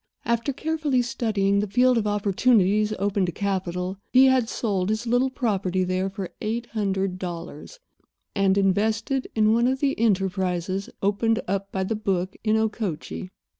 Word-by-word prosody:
After 235 +4 0
carefully 300 -3 0
studying 200 -4 0
the 210 - -1
field 250 +4 +4
of 220 -2 0
opportunities 210 0 +2
open 200 0 0
to - - -2
capital 185 -1 -3
he 260 +1 +7
had 260 -3 +3
sold 200 -4 -1
his 220 +2 -1
little 245 +3 +2
property 195 -7 -1
there 185 +1 -1
for 195 -2 -6
eight 230 +3 -2
hundred 195 -3 -1
dollars 175 - -7 0.5
and 195 -1 +2
invested 220 +7 +1
it - - -30
in 215 0 +4
one 235 +2 +3
of 260 +1 0
the 275 -1 +1
enterprises 190 -3 0
opened 225 +3 +2
up 195 +1 -2
by 190 - -1
the 220 +4 -2
book 190 -3 -2
in 215 0 +2
Okochee. 210 -5 -3
205 Hz, 160 wpm, -24 LUFS, 190-230 Hz, 0.5 s, he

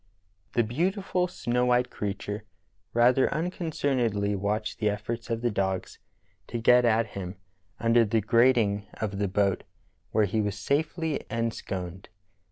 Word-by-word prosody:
The 120 - +3
beautiful 180 - 0
snow 125 -7 0
white 125 0 +2
creature 105 0 -4 0.5
rather 125 +3 +4
unconcernedl}^ 135 - 0
watched 105 +3 -2
the 105 - +1
eflPorts 105 +3 -3
of 115 -1 -1
the 120 - +2
dogs 95 -2 -2 0.5
to 120 - -3
get 125 +1 +5
at 115 -1 +3
him 95 -1 -6 0.4
under 115 +1 +4
the 110 +1 +1
grating 115 -2 +3
of 100 -2 -3
the 100 - +1
boat 100 0 +1 0.5
where 110 - +3
he 110 +3 0
was 105 -1 -2
safely 155 - -1
ensconced. 95 -5 -4
115 Hz, 135 wpm, -27 LUFS, 100-125 Hz, 0.5 s, get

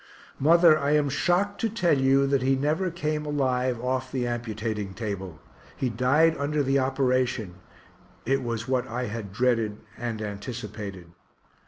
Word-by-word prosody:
Mother, 165 +2 +6
I 140 +1 +1
am 150 -2 +3
shocked 180 +8 0
to 225 - +1
tell 190 -8 +2
you 135 0 +3
that 140 -1 +1
he 135 +1 +2
never 155 +7 0
came 155 -3 -2
alive 130 -4 0
off 130 +1 -2
the 125 -2 -1
amputating 110 -4 -3
table 95 -7 -5 0.4
he 130 -3 -1
died 140 +8 +3
under 145 +1 0
the 135 +1 +2
operation 130 -7 0 0.7
it 135 +3 +1
was 115 -1 -3
what 130 -1 0
I 125 +1 -3
had 105 -2 -5
dreaded 115 -1 +1 0.2
and 115 -2 -3
anticipated. 105 -4 -6
130 Hz, 150 wpm, -26 LUFS, 115-145 Hz, 0.7 s, Mother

